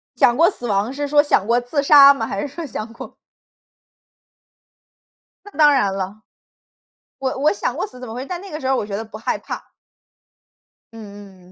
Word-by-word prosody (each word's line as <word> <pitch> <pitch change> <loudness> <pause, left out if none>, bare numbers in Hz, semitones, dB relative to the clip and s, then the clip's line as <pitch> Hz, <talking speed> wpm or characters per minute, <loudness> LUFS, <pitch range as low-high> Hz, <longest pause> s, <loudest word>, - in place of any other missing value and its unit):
想 240 - +4
过 335 +2 +5
死 245 -11 -7
亡 205 +2 0
是 290 +1 -3
说 290 +1 +4
想 250 -9 +1
过 235 +1 +3
自 245 +4 -2
杀 280 -1 +8
吗？ 230 -5 -4
还 200 - -4
是 - - -3
说 320 +4 -7
想 225 -5 -6
过 235 - -11 2.3
那 410 - -12
当 300 -2 +6
然 205 -8 +1
了。 195 +2 -5 1.0
我 265 -1 -3
我 300 +5 +3
想 - - -3
过 - - -3
死 255 - -14
怎 250 - -8
么 220 - -8
回 250 +3 -6
但 355 +3 -6
那 395 -1 -11
个 305 - -5
时 265 - -4
候 265 - +2
儿 - - 0
我 - - -2
觉 200 -1 -5
得 225 - -5
不 215 -1 -10
害 220 - -2
怕。 - - -9 1.2
嗯 200 -4 -13
250 Hz, 215 characters per minute, -20 LUFS, 210-290 Hz, 2.3 s, 杀